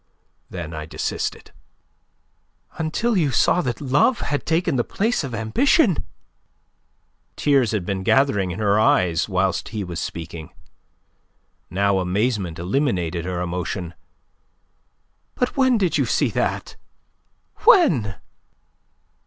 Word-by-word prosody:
Then 85 -3 -6
I 75 -1 -6
desisted." - - -4 1.3
"Until 190 +9 0
you 160 -7 +2
saw 135 +7 +3
that 125 -7 -3
love 145 - +2
had 145 0 -3
taken 165 -2 +1
the 120 - +1
place 220 - -1
of 130 -4 -4
ambition!" 180 - +2 1.3
Tears 135 -5 +2
had 105 -5 -2
been 95 0 -2
gathering 100 -3 +2
in 90 - -5
her 105 -1 +2
eyes 90 -4 +2
whilst 95 0 0
he 105 -2 -4
was 85 -3 -5
speaking. 80 -1 -6 1.2
Now 100 +1 +1
amazement 95 -1 -1
eliminated 90 - -1
her 90 -1 -3
emotion. 90 0 -4 1.4
"But 250 - -1
when 260 -3 +3
did 185 -5 +1
you - - +1
see - - +1
that? - - -2 0.8
When?" 165 - +4
105 Hz, 115 wpm, -22 LUFS, 90-150 Hz, 1.4 s, When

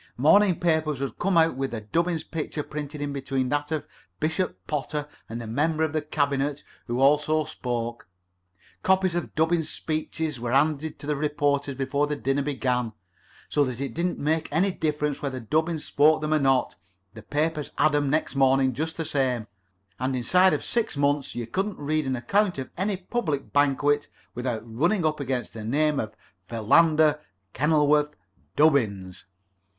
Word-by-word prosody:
Morning 180 +7 +5
papers 160 -4 +1
would 140 -1 -4
come 190 -1 +2
out 165 -3 +4
with 135 -2 -3 0.2
Dubbins's 170 -1 +1
picture 155 -1 -4
printed 150 0 -6
in 145 -1 -2
between 135 -2 -2
that 145 +2 -1
of 155 -2 -2 0.3
Bishop 160 +4 -1
Potter 150 0 -3 0.2
and 115 +1 -5
a - - -7
member 155 +8 0
of 155 -2 -1
the 155 - 0
cabinet, 145 -1 -1 0.2
who 120 +1 -2
also 150 +3 +3
spoke. 120 -7 -4 0.7
Copies 190 -1 +2
of 175 -1 -3
Dubbins's 160 0 +1
speeches 155 -2 -3
were 120 +1 -3
handed 150 +2 +1
to - - -10
the 150 0 0
reporters 145 -1 0
before 140 +2 0
the 150 - -2
dinner 140 0 0
began, 125 -5 -1 0.5
so 145 - +2
that 130 -3 -3
it 135 -4 -3
didn't 175 +2 -1
make 155 +2 0
any 180 +6 +2
difference 150 -4 -1
whether 135 -3 -3
Dubbins 155 +6 -1
spoke 155 +2 +4
them 155 0 -1
or 155 - +3
not 135 -3 +2 0.4
the 110 - -10
papers 150 +3 -1
had 155 -1 +3
'em 145 -1 +1
next 155 0 0
morning 135 -1 +3
just 160 +6 -3
the 165 - -2
same, 130 -6 0 0.5
and 130 +1 -1
inside 180 +10 +4
of - - -1
six 230 -10 -1
months 140 -2 0
you 120 -1 -3
couldn't 195 - -2
read 150 0 -1
an 130 - 0
account 185 - +1
of 130 - -5
any 195 +1 -1
public 180 - -3
banquet 145 +1 +2 0.3
without 125 -3 -3
running 160 - 0
up 155 -1 0
against 130 -4 -3
the 110 - -7
name 150 +6 +1
of 110 0 -4 0.3
Philander 150 +7 +4 0.3
Kenilworth 150 +1 +2 0.4
Dubbins." 105 - +2
145 Hz, 165 wpm, -26 LUFS, 135-160 Hz, 0.7 s, Morning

